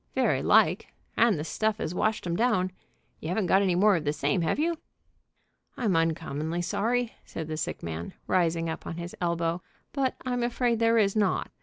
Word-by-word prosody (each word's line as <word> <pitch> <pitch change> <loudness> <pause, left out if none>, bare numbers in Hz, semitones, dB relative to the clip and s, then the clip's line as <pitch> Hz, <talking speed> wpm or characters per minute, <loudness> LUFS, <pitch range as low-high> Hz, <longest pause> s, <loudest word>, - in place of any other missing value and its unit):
"Very - - +2
like, - - +4 0.3
and 230 -6 +4
the 150 - -3
stuff 215 +5 -1
as 165 - -3
washed 215 +3 0
'em 170 -1 -1
down. 185 -4 +1 0.5
You 155 - -5
haven't 190 +2 0
got 190 +3 +4
any 185 -3 +2
more 200 +2 +5
of 165 - -1
the 145 - +1
same, 145 +3 0
have 165 - 0
you?" 330 +2 0 1.0
"I'm 215 -8 +1
uncommonly 165 0 -1
sorry," 235 +6 0
said 160 - -6
the 155 - -3
sick 155 - -4
man, 85 0 -5
rising 165 -2 +1
up 160 - -5
on 165 - -5
his 170 +1 -6
elbow, 170 0 0 0.3
"but 270 -2 0
I'm 245 -1 -1
afraid 240 -1 +1
there 230 0 +4
is 200 -2 +3
not. 205 -3 +1
180 Hz, 190 wpm, -27 LUFS, 165-225 Hz, 1.0 s, more